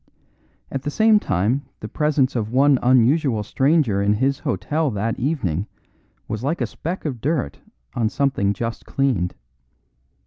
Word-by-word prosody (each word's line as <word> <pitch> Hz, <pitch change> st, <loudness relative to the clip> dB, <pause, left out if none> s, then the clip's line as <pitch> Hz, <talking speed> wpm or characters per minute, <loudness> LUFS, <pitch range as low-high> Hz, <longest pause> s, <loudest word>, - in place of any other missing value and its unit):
At 135 Hz, -, -3 dB
the 145 Hz, -, -3 dB
same 215 Hz, +6 st, +4 dB
time 105 Hz, -, 0 dB, 0.2 s
the -, -, -6 dB
presence 150 Hz, -4 st, +1 dB
of 110 Hz, -2 st, -2 dB
one 135 Hz, +1 st, +4 dB
unusual 125 Hz, -1 st, +3 dB
stranger 135 Hz, -3 st, +2 dB
in 100 Hz, +1 st, +2 dB
his 135 Hz, +5 st, 0 dB
hotel 155 Hz, 0 st, -1 dB
that 110 Hz, 0 st, -2 dB
evening 110 Hz, -, -1 dB, 0.6 s
was 110 Hz, +2 st, -4 dB
like 160 Hz, +6 st, -1 dB
a -, -, +1 dB
speck 175 Hz, +3 st, -5 dB
of 130 Hz, -7 st, -4 dB
dirt 145 Hz, -, -1 dB, 0.3 s
on 115 Hz, -3 st, 0 dB
something 130 Hz, -8 st, 0 dB
just 115 Hz, +3 st, -5 dB
cleaned. 125 Hz, -11 st, 0 dB
130 Hz, 145 wpm, -22 LUFS, 110-145 Hz, 0.6 s, same